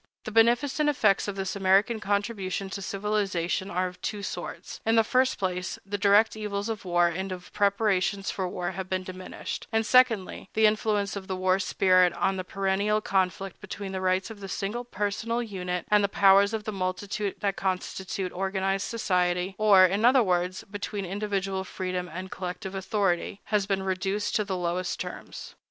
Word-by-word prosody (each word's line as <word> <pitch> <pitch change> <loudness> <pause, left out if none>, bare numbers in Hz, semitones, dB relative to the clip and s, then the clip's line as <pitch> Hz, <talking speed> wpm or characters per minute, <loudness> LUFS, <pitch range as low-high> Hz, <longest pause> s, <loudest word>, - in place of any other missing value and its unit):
The 215 - -6
beneficent 240 +7 +3
effects 210 -10 +2
of 205 - -3
this 195 0 -3
American 200 +4 +3
contribution 200 -2 -2
to 200 - -5
civilization 195 -3 -1
are 185 -1 0
of 180 0 -7
two 205 0 -3
sorts: - - -6
in 225 +1 +2
the 225 - +6
first 255 +3 +2
place, 185 -1 -2
the 205 +1 -3
direct 205 +3 +4
evils 210 0 -3
of 220 -3 -4
war 175 -1 +3
and 190 +3 -3
of 180 -1 -8
preparations 200 -1 +1
for 190 -2 -2
war 175 0 -3
have 190 0 -6
been 185 0 -1
diminished; 185 0 -7
and 225 -1 +1
secondly, 225 -7 +3
the 220 - +4
influence 210 -1 +1
of 195 -1 -6
the 190 - -2
war 185 +1 +2
spirit 185 -1 +3
on 195 - 0
the 185 - -3
perennial 195 +3 0
conflict 190 -1 -1
between 200 -1 -6
the 190 -1 -3
rights 185 +3 0
of 215 - -10
the 195 -1 -7
single 210 +6 -3
personal 230 +1 -2
unit 180 -5 -4
and 210 -1 +5
the 200 - +1
powers 200 +1 +5
of 220 -1 -3
the 215 - -3
multitude 195 +2 -3
that 200 -1 0
constitute 190 0 -3
organized 195 +1 -1
society—or, 185 -1 +3
in 195 +4 0
other 250 +1 +6
words, 180 -1 0
between 205 -1 -4
individual 195 0 -2
freedom 185 -1 -4
and 185 +2 -6
collective 185 +1 -5
authority—has 195 +1 -1
been 195 -1 0
reduced 190 +2 -1
to 210 - +2
the 195 -2 -3
lowest 175 0 -2
terms. - - -7
195 Hz, 175 wpm, -27 LUFS, 185-210 Hz, -, the